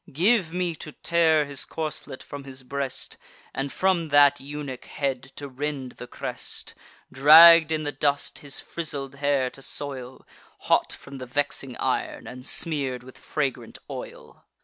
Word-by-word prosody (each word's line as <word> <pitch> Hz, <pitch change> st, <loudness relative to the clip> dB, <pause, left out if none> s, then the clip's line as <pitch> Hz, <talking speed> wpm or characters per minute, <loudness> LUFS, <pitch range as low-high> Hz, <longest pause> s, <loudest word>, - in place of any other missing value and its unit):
Give 180 Hz, -, +2 dB
me 180 Hz, -1 st, -1 dB
to 155 Hz, -, -9 dB
tear 160 Hz, -3 st, +3 dB
his 140 Hz, -1 st, -3 dB
corslet 150 Hz, -4 st, -4 dB
from 145 Hz, -1 st, -8 dB
his 135 Hz, -1 st, -9 dB
breast, 140 Hz, 0 st, -4 dB, 0.4 s
And 135 Hz, 0 st, -3 dB
from 185 Hz, -3 st, +1 dB
that 145 Hz, -1 st, +5 dB
eunuch 140 Hz, -2 st, -7 dB
head 130 Hz, -2 st, -3 dB
to 145 Hz, -, -7 dB
rend 135 Hz, -1 st, -4 dB
the 125 Hz, -, -10 dB
crest; -, -, -6 dB, 0.4 s
Dragg'd 160 Hz, +3 st, +9 dB
in 155 Hz, -1 st, 0 dB
the 145 Hz, -, -2 dB
dust, 145 Hz, -1 st, -1 dB
his 140 Hz, -2 st, -4 dB
frizzled 145 Hz, -5 st, -5 dB
hair 140 Hz, -2 st, 0 dB
to 135 Hz, -, -11 dB
soil, 130 Hz, -2 st, -6 dB, 0.4 s
Hot -, -, +2 dB
from 140 Hz, -1 st, -10 dB
the 130 Hz, -, -7 dB
vexing 135 Hz, -1 st, -2 dB
ir'n, -, -, -2 dB
and 125 Hz, +2 st, -9 dB
smear'd 140 Hz, -6 st, -1 dB
with 130 Hz, 0 st, -14 dB
fragrant 145 Hz, -4 st, -3 dB
oil!" -, -, -9 dB
145 Hz, 150 wpm, -25 LUFS, 135-155 Hz, 0.4 s, Dragg'd